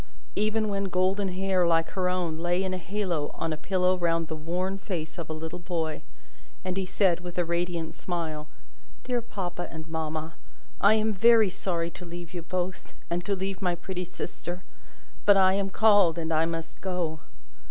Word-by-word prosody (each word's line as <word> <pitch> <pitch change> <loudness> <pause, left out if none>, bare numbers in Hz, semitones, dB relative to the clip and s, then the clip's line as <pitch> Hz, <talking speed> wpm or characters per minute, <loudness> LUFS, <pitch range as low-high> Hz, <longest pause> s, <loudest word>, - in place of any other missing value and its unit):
Even 215 +1 +2
when 200 -1 0
golden 190 +2 +2
hair, 185 -1 +2
like 165 -1 +3
her 185 -2 +1
own, 175 -3 -1
lay 175 +2 +1
in 190 -1 -1
a 185 - -2
halo 180 -5 -1
on 165 -1 -1
a - - -1
pillow 185 +3 +2
round 165 -2 +1
the 160 - -2
worn 180 +5 -2
face 175 -3 -4
of 165 - -5
a - - -2
little 160 +2 -4
boy, 165 -3 -2 0.6
and 185 -1 -1
he 190 -1 -1
said, 185 -2 +3
with 175 0 -8
a 175 - +2
radiant 170 -1 -1
smile, 160 -4 -3 0.6
"Dear 245 -1 0
papa 180 -6 -4
and 160 -1 -7
mamma, 160 0 -3 0.5
I 205 +2 +6
am 220 0 +2
very 225 0 +6
sorry 170 -2 -1
to 180 - -9
leave 175 0 -8
you 175 - -3
both, 185 +2 -3 0.2
and 175 +1 0
to 200 - +1
leave 190 +1 -3
my 180 -2 +2
pretty 180 +1 -4
sister; 180 0 -6 0.6
but 205 -1 +7
I 190 -1 +6
am 195 0 +1
called, 200 -5 +5
and 165 -1 -1
I 160 +1 +3
must 165 -1 -5
go!" 175 -4 -1
180 Hz, 185 wpm, -28 LUFS, 165-190 Hz, 0.6 s, but